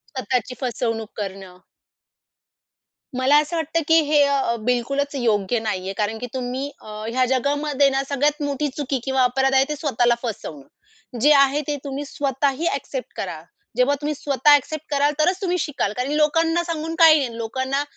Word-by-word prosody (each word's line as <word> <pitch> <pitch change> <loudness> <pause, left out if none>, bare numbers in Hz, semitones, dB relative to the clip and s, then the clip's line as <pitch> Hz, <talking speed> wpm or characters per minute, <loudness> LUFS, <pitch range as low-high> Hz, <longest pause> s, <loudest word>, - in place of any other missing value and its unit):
स्वतःची 250 0 -2
फसवणूक 230 -3 -2
करणं. 190 -3 -7 1.6
मला 270 +3 +4
असं 305 +3 -5
वाटतं 325 +1 -1
की, 325 0 +6
हे 295 -1 +3
अ, 275 -4 +1
बिलकुलच 275 +4 0
योग्य 225 -3 +1
नाहीये. 195 -3 -3
कारण 215 +1 -1
की 245 - -5
तुम्ही 260 +2 -3
अ, - - -15 0.2
ह्या 255 +2 +1
जगामध्ये 280 +2 +1
ना 270 0 0
सगळ्यात 290 +2 0
मोठी 285 +1 -1
चुकी 275 -3 -2
किंवा 265 -1 +1
अपराध 265 +2 +1
आहे, 265 0 +5
ते 300 - -2
स्वतःला 245 -5 +1
फसवणं. 195 - -6 0.5
जे 295 - +5
आहे 275 +1 +4
ते 295 - -1
तुम्ही 280 +1 -5
स्वतःही 280 +3 -1
ॲक्सेप्ट - - -5
करा. - - -5 0.4
जेव्हा 255 +3 +3
तुम्ही 300 +1 -1
स्वतः 280 +1 +2
ॲक्सेप्ट 305 +2 0
कराल 285 +1 +2
तरच 360 +5 +2
तुम्ही 360 -2 0
शिकाल. 265 -9 -2
कारण 250 +4 -3
की 300 - 0
लोकांना 325 +3 +2
सांगून 330 -1 -4
काही 320 -2 +8
नाही. 240 -4 -3
लोकांना 260 +5 -2
275 Hz, 165 wpm, -22 LUFS, 245-295 Hz, 1.6 s, काही